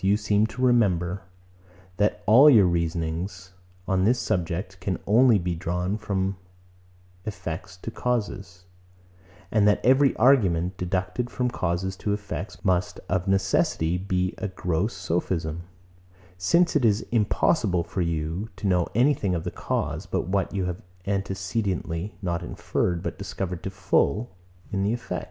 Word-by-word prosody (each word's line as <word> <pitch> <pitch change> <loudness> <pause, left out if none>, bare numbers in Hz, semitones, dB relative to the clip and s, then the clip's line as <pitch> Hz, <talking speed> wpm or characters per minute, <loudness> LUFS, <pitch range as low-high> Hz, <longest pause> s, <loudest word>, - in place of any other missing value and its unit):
You 100 +2 +4
seem 105 -1 +1
not - - -4
to 125 +3 -5
remember, 100 -7 +2 0.8
that 105 +1 +1
all 130 +8 +8
your 110 -8 +7
reasonings 85 +2 -2 0.3
on 95 -1 +2
this 120 +5 +3
subject 95 -2 -2
can 90 -1 -2
only 115 +2 +5
be 90 -1 -2
drawn 90 +3 -2
from 100 -3 -2 0.9
effects 90 -2 -6
to 110 - -7
causes; 100 -7 -3 0.9
and 105 -2 +4
that 105 - +4
every 135 +2 +5
argument, 95 -9 +3
deducted 90 +7 -2
from 125 0 -1
causes 95 -1 -2
to 105 - -1
effects, 100 -1 -6
must 90 -1 +1
of 95 +1 0
necessity 95 -3 +1
be 90 -1 -1
a 105 - -2
gross 90 +2 -2
sophism; 85 -2 -2 0.7
since 170 - +2
it 145 - +3
is 110 -2 +2
impossible 105 - +2
for 85 +2 -3
you 85 +4 -2
to 100 - -7
know 90 -3 +2
anything 120 -7 +2
of 80 - -3
the 90 - -3
cause, - - -3
but - - -2
what 95 0 0
you 95 -2 -1
have 90 0 -4 0.2
antecedently, 95 -2 -2
not 85 -1 -1
inferred, 85 0 -2
but - - -4
discovered 95 -2 -4
to - - -4
the 95 - -15
full, 95 +3 +1 0.4
in 100 -2 -1
the 100 +3 +1
effect. 120 - -3
95 Hz, 150 wpm, -25 LUFS, 90-105 Hz, 0.9 s, all